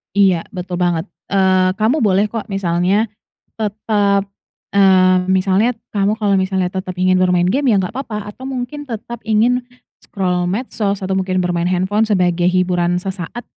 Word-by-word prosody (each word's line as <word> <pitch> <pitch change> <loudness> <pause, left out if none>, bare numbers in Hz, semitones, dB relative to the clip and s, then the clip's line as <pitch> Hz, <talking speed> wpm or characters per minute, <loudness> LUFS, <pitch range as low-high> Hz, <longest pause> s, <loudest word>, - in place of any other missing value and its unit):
Iya, 190 -4 +3
betul 180 0 -4
banget. 175 -2 0 0.2
Eee, 185 -1 +2
kamu 225 +10 +1
boleh 205 -1 +2
kok, 225 -2 -4
misalnya 190 +1 +1 0.5
tetap, 205 -2 0 0.5
eee, 185 -2 +5
misalnya, 190 +5 +2 0.2
kamu 205 +2 +1
kalau 205 -2 +1
misalnya 190 -1 +1
tetap 185 0 -5
ingin 185 0 +3
bermain 180 -1 +2
game 260 +6 +1
ya 205 - +4
enggak 190 +4 -3
apa-apa 215 -6 -5
atau - - -15
mungkin 265 +2 -5
tetap 230 +1 -6
ingin 225 +4 +2 0.4
scroll 180 -3 -1
medsos, 205 -2 -2
atau 190 0 -2
mungkin 185 -1 -1
bermain 175 -1 0
handphone 190 +4 +1
sebagai 180 -4 +2
hiburan 180 -1 +1
sesaat, 190 +5 -6
190 Hz, 150 wpm, -18 LUFS, 185-215 Hz, 0.5 s, eee